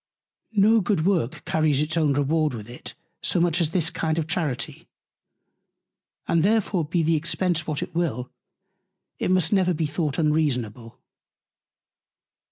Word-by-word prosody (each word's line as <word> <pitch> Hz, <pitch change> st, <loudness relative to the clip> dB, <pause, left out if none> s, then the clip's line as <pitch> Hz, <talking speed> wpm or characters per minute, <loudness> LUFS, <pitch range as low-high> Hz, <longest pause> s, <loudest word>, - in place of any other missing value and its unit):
No 215 Hz, +2 st, +5 dB
good 180 Hz, -4 st, 0 dB
Work 175 Hz, -10 st, 0 dB
carries 155 Hz, -3 st, +1 dB
its 155 Hz, +2 st, 0 dB
own 155 Hz, -4 st, +2 dB
Reward 145 Hz, 0 st, +1 dB
with 105 Hz, -2 st, -8 dB
it 125 Hz, -, -9 dB, 0.3 s
so -, -, +1 dB
much 175 Hz, 0 st, +2 dB
as 160 Hz, -, +1 dB
this 165 Hz, -1 st, 0 dB
kind 160 Hz, -1 st, -1 dB
of 165 Hz, -, 0 dB
Charity; 160 Hz, -6 st, -3 dB, 1.4 s
and 165 Hz, -, +2 dB
therefore 200 Hz, -2 st, +1 dB
be 165 Hz, +2 st, 0 dB
the 165 Hz, +1 st, +2 dB
Expence 165 Hz, +1 st, 0 dB
what 150 Hz, -3 st, -2 dB
it -, -, -9 dB
will, 140 Hz, -8 st, -2 dB, 0.9 s
it -, -, -1 dB
must 185 Hz, -1 st, +2 dB
never 185 Hz, -3 st, +2 dB
be 160 Hz, +1 st, -1 dB
thought 150 Hz, -1 st, -2 dB
unreasonable. 130 Hz, -8 st, -1 dB
160 Hz, 145 wpm, -24 LUFS, 150-175 Hz, 1.4 s, No